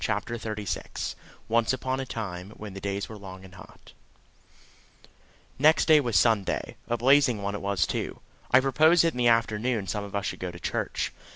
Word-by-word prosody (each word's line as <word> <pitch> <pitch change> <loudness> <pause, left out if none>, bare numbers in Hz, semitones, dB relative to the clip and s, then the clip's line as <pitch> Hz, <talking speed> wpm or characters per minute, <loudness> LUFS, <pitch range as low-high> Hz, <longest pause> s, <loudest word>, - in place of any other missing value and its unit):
CHAPTER 110 +2 -1
THIRTY 105 -2 -5
SIX - - -4 0.3
Once 115 +2 +2
Upon 130 0 -2
a 135 - -4
Time, 95 -5 -5
when 105 -2 -8
the 95 - -8
days 100 0 -3
were 110 -2 -10
long 95 -1 -10
and 95 - -14
hot 95 - -15 1.7
Next 155 +3 +5
day 155 -2 +7
was 120 -6 -1
Sunday 100 +2 +1
a 120 0 0
blazing 125 -3 +4
one 100 0 -2
it 105 - -4
was 100 -2 +1
too. - - -4 0.3
I 130 - +6
proposed 155 +6 +4
that 165 - +2
in 125 - -6
the 120 - +3
afternoon 115 -1 +1
some 105 +2 -3
of 100 0 -8
us 100 - -1
should - - -4
go 90 - -3
to 85 0 -10
church. - - -2
110 Hz, 195 wpm, -27 LUFS, 100-130 Hz, 1.7 s, day